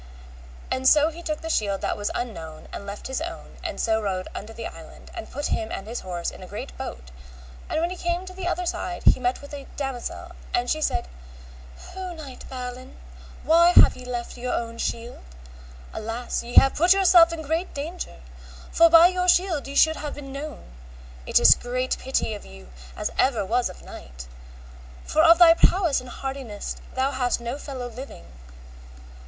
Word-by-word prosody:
And 260 Hz, 0 st, +3 dB
so 305 Hz, +1 st, +5 dB
he 335 Hz, +2 st, -10 dB
took 310 Hz, -3 st, -3 dB
the 325 Hz, -, -5 dB
shield 200 Hz, -6 st, 0 dB
that -, -, -1 dB
was 205 Hz, 0 st, -2 dB
unknown 165 Hz, -10 st, -6 dB
and 200 Hz, -, -7 dB
left 200 Hz, +1 st, -7 dB
his 265 Hz, +3 st, -3 dB
own, 335 Hz, 0 st, -7 dB
and -, -, -4 dB
so 220 Hz, -1 st, +1 dB
rode 185 Hz, -3 st, -2 dB
unto 210 Hz, +2 st, -7 dB
the 225 Hz, 0 st, -7 dB
island, -, -, -11 dB
and 345 Hz, -, -7 dB
put 290 Hz, +2 st, -3 dB
him 220 Hz, -, -2 dB
and 195 Hz, -, -5 dB
his 230 Hz, +3 st, -4 dB
horse 175 Hz, -2 st, -4 dB
in -, -, -13 dB
a -, -, -9 dB
great -, -, -7 dB
boat; -, -, -7 dB, 0.6 s
and -, -, 0 dB
when 340 Hz, +2 st, 0 dB
he -, -, -4 dB
came 345 Hz, 0 st, -1 dB
on 370 Hz, 0 st, -10 dB
the 370 Hz, -2 st, -4 dB
other 360 Hz, 0 st, -1 dB
side 180 Hz, -, -3 dB
he -, -, +5 dB
met 250 Hz, +2 st, -1 dB
with 285 Hz, -, -11 dB
a 280 Hz, -1 st, -8 dB
damosel, 270 Hz, -4 st, -5 dB, 0.2 s
and 245 Hz, 0 st, 0 dB
she 310 Hz, -, 0 dB
said, 180 Hz, -, 0 dB, 0.9 s
O 370 Hz, -1 st, -5 dB
knight 280 Hz, -5 st, -10 dB
Balin, 255 Hz, 0 st, -7 dB, 0.5 s
why 340 Hz, +2 st, +5 dB
have -, -, +8 dB
ye 255 Hz, -, -10 dB
left 245 Hz, -1 st, -5 dB
your 250 Hz, +1 st, -2 dB
own 230 Hz, 0 st, -4 dB
shield? 235 Hz, +1 st, -4 dB, 0.7 s
alas 225 Hz, +3 st, -3 dB
ye 240 Hz, +1 st, -8 dB
have 270 Hz, -, +7 dB
put 345 Hz, +4 st, +5 dB
yourself 355 Hz, -3 st, +6 dB
in 330 Hz, -1 st, -5 dB
great 320 Hz, +5 st, -2 dB
danger, 290 Hz, -, -6 dB, 0.5 s
for 335 Hz, 0 st, +6 dB
by 330 Hz, +1 st, +9 dB
your 365 Hz, 0 st, +2 dB
shield 350 Hz, -6 st, +3 dB
ye 280 Hz, -, -7 dB
should 315 Hz, +2 st, +5 dB
have 295 Hz, -1 st, -5 dB
been 275 Hz, -2 st, -9 dB
known; 275 Hz, -, -8 dB, 0.6 s
it -, -, +5 dB
is -, -, +9 dB
great 255 Hz, +1 st, -2 dB
pity 260 Hz, -4 st, -1 dB
of 210 Hz, -, -8 dB
you 65 Hz, -1 st, -13 dB, 0.3 s
as -, -, -2 dB
ever 235 Hz, -7 st, +2 dB
was 240 Hz, +4 st, +1 dB
of -, -, -12 dB
knight, 60 Hz, 0 st, -10 dB, 0.8 s
for 310 Hz, -, +2 dB
of 330 Hz, +1 st, +7 dB
thy 340 Hz, -1 st, +9 dB
prowess 340 Hz, -3 st, +3 dB
and 255 Hz, -, -11 dB
hardiness 265 Hz, -6 st, -5 dB, 0.2 s
thou 265 Hz, +1 st, +1 dB
hast 250 Hz, -3 st, 0 dB
no 235 Hz, +2 st, -4 dB
fellow 260 Hz, -4 st, -6 dB
living. 245 Hz, -, -10 dB
265 Hz, 195 wpm, -25 LUFS, 230-325 Hz, 0.9 s, by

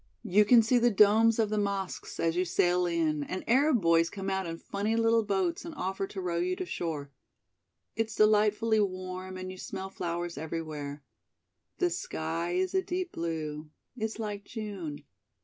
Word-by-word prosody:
You 210 Hz, -1 st, +4 dB
can 230 Hz, +1 st, +7 dB
see 245 Hz, +3 st, +3 dB
the 240 Hz, +1 st, +4 dB
domes 220 Hz, +2 st, +5 dB
of 220 Hz, -2 st, +1 dB
the 215 Hz, -, +1 dB
mosques 200 Hz, -2 st, -3 dB
as 165 Hz, 0 st, +1 dB
you 180 Hz, -, +2 dB
sail 180 Hz, 0 st, +2 dB
in 160 Hz, -3 st, 0 dB
and 185 Hz, +6 st, -5 dB
Arab 260 Hz, 0 st, +4 dB
boys 165 Hz, 0 st, +4 dB
come 195 Hz, -1 st, -4 dB
out 190 Hz, -1 st, -1 dB
in 165 Hz, 0 st, -4 dB
funny 205 Hz, +5 st, -2 dB
little 230 Hz, 0 st, +4 dB
boats 195 Hz, -5 st, -1 dB
and 335 Hz, -1 st, -8 dB
offer 195 Hz, -4 st, -2 dB
to 195 Hz, -, -7 dB
row 175 Hz, -2 st, -1 dB
you 180 Hz, +1 st, 0 dB
to 185 Hz, -, -4 dB
shore. 155 Hz, -5 st, -4 dB, 0.8 s
It's 225 Hz, -1 st, -1 dB
delightfully 215 Hz, +1 st, +4 dB
warm 185 Hz, -1 st, -3 dB
and 185 Hz, 0 st, -5 dB
you 185 Hz, -, -10 dB
smell 190 Hz, 0 st, -6 dB
flowers 175 Hz, -3 st, -3 dB
everywhere. 150 Hz, -3 st, -5 dB, 0.7 s
The 360 Hz, -1 st, +1 dB
sky 165 Hz, -, -3 dB
is 185 Hz, +1 st, 0 dB
a 380 Hz, -, +3 dB
deep 365 Hz, -1 st, -3 dB
blue. 155 Hz, -2 st, -4 dB, 0.3 s
It's 220 Hz, -2 st, -3 dB
like 210 Hz, -2 st, -4 dB
June. 195 Hz, -11 st, -6 dB
190 Hz, 175 wpm, -30 LUFS, 170-215 Hz, 0.8 s, can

